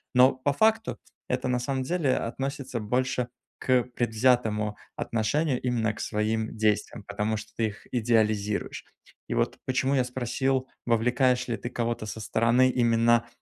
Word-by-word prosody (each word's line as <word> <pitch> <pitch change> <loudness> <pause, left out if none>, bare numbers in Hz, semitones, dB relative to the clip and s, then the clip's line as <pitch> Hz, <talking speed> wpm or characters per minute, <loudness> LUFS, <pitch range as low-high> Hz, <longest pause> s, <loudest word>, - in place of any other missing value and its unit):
Но 130 +2 +7
по 130 +2 -1
факту 220 +7 +2 0.3
это 125 0 -1
на 125 - +1
самом 130 +1 -2
деле 145 -2 +1
относится 135 +1 -3
больше 125 +3 0 0.3
к 130 -1 +3
предвзятому 110 -3 +1 0.2
отношению 125 +5 0
именно 115 -3 0
к - - -12
своим 110 +1 -1
действиям, 110 -1 0
потому 110 +1 -1
что 110 +1 -7
ты 115 - +2
их 105 -1 -10
идеализируешь. 110 -3 0 0.4
И - - -2
вот - - 0
почему 130 +1 +1
я 130 - +3
спросил, 130 +1 -1 0.2
вовлекаешь 125 +2 +2
ли 115 - -1
ты 120 - -5
кого-то 120 -2 -2
со 110 +1 -6
стороны 115 +4 +3
именно, 120 -1 +3
120 Hz, 150 wpm, -27 LUFS, 110-130 Hz, 0.4 s, Но